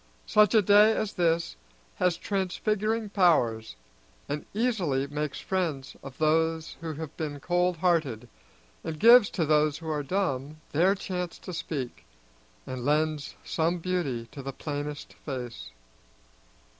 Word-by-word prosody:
Such 210 +1 +4
a 215 - +6
day 210 +3 +6
as 215 -1 -2
this 165 - 0 0.4
has 180 -2 +2
transfiguring 210 +3 -1
powers, 120 - +2 0.5
and 145 +1 -4
easily 195 - 0
makes 150 0 -4
friends 165 -8 -2
of 135 -2 -10
those 160 +1 +1
who 165 -1 -4
have 155 0 -7
been 150 -2 -4
cold 175 +3 +1
hearted, 155 - +1 0.6
and 155 -1 -5
gives 235 +1 +8
to 170 - -1
those 150 -1 +3
who 160 -1 -5
are 150 -1 -1
dumb 150 -3 -2
their 180 +6 +3
chance 180 -3 -4
to 185 - -8
speak, 145 -6 -5 0.6
and 130 -1 -5
lends 150 +1 0
some 165 +2 0
beauty 165 -10 -2
to 140 - -8
the 135 0 -6
plainest 145 +1 -5
face. 125 - -6
160 Hz, 135 wpm, -28 LUFS, 145-185 Hz, 0.6 s, gives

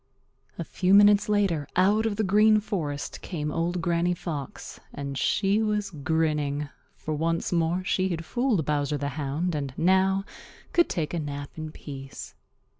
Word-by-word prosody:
A - - -3
few 190 +1 +2
minutes 205 0 +6
later 195 -9 +1
out 205 +5 +3
of 210 - -2
the 215 - 0
Green 215 +2 +5
Forest 155 -9 -4
came 150 -4 -4
Old 170 +2 -1
Granny 175 +1 +1
Fox, 150 -6 -6
and 140 -1 -5
she 200 +9 +2
was 210 -2 -1
grinning, 150 -2 -1 0.3
for 155 - -5
once 165 +2 -1
more 170 +1 +1
she 190 0 0
had 165 -2 -3
fooled 235 - 0
Bowser 145 -1 0
the 140 0 -2
Hound 150 +4 -2
and 140 -3 -3
now 190 +2 +3 0.5
could 345 -1 +4
take 160 -3 -2
a 170 - -1
nap 145 -2 -5
in 155 -1 -6
peace. 135 -3 -9
170 Hz, 160 wpm, -26 LUFS, 150-195 Hz, 0.5 s, minutes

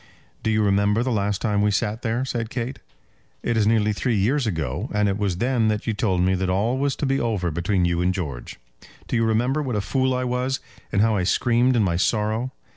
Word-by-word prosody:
"Do - - -1
you 110 -1 +2
remember 100 +2 +2
the 130 - -1
last 100 -3 -1
time 105 -2 +1
we 105 - +3
sat 105 +3 -1
there?" 120 +1 -1
said 115 -3 -3
Kate. 125 +2 -4 0.6
"It 120 - 0
is 105 -2 +2
nearly 105 -1 +2
three 120 +3 0
years 120 +6 +1
ago, 80 - -2
and 105 0 +1
it 100 - 0
was 100 -4 -1
then 120 +1 +1
that 105 -1 -1
you 115 - 0
told 95 -4 0
me 95 +1 +2
that 95 0 -1
all 110 +8 +1
was 140 -1 0
to - - -2
be 135 0 +1
over 105 -7 -1
between 90 +3 0
you 85 0 0
and 90 +1 +2
George. 75 -10 -5 0.5
Do - - -2
you 115 - +2
remember 120 +6 +1
what 130 -6 -2
a - - +1
fool 130 +4 0
I 125 - -1
was, 125 +1 -1 0.3
and 100 - +3
how 110 -1 +2
I 100 - +1
screamed 120 +6 +2
in 115 - +3
my 85 -3 +1
sorrow? 110 +6 0
110 Hz, 235 wpm, -23 LUFS, 100-120 Hz, 0.6 s, we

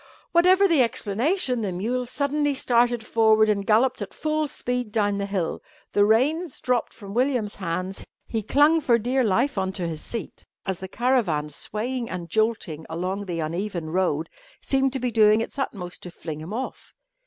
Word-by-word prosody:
Whatever 370 +3 +5
the 330 -7 +4
explanation, 250 - 0
the 200 -3 -2
mule 240 +8 -2
suddenly 285 +2 0
started 240 -2 +2
forward 220 -1 +4
and 200 -1 +1
galloped 230 +3 +3
at 200 - -6
full 310 0 0
speed 245 -5 -3
down 205 -2 +1
the 200 - -2
hill. 190 -5 -2 0.3
The 205 - +4
reins 270 - +2
dropped 250 -2 0
from 200 -3 -10
William's 245 -3 +1
hands; 185 +1 -4 0.2
he 225 - -2
clung 295 +8 +4
for 240 -5 +4
dear 250 +4 +1
life 230 +3 +1
on 190 0 -1
to 180 -3 -3
his 160 -2 -5
seat, 230 - -6 0.2
as 190 -3 -2
the 190 - -6
caravan, 200 - +1
swaying 230 - -3
and 170 -3 -6
jolting 215 -8 0
along 185 +5 -3
the 170 -2 -2
uneven 170 0 -3
road, 170 -4 0 0.3
seemed 270 -1 +1
to 265 - -1
be 250 -1 -1
doing 215 -1 +5
its 225 +4 -4
utmost 180 -9 -4
to 180 - -7
fling 155 -3 -7
him 160 +5 -8
off. 250 +4 -6
220 Hz, 175 wpm, -25 LUFS, 190-255 Hz, 0.3 s, Whatever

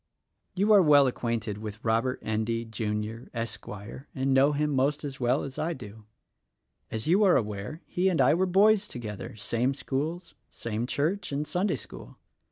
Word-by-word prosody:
You 205 +3 +4
are 200 - +8
well 145 -4 +6
acquainted 115 -4 -2
with 105 -1 -6
Robert 115 +3 +1
Endy, 110 +2 -1
Jr., 110 +1 -3
Esquire, 115 +2 -6
and 135 0 +1
know 135 +2 +5
him 150 +1 0
most 140 +2 +1
as 140 -2 -6
well 125 +2 +1
as 135 -1 -6
I 165 +2 0
do. 110 -5 -11 0.8
As 110 -1 -4
you 185 +7 +4
are 190 -3 +6
aware, 105 - -4
he' 185 +2 +1
and 175 - 0
I - - +5
were 185 +3 +2
boys 205 +3 +4
together; 110 - -7
same 115 +5 -1
schools, 150 +6 -3 0.2
"same 115 +1 -4
church 160 +10 -1
and 145 +2 -1
Sunday 185 +6 0
school. - - -10
130 Hz, 170 wpm, -28 LUFS, 110-155 Hz, 0.8 s, are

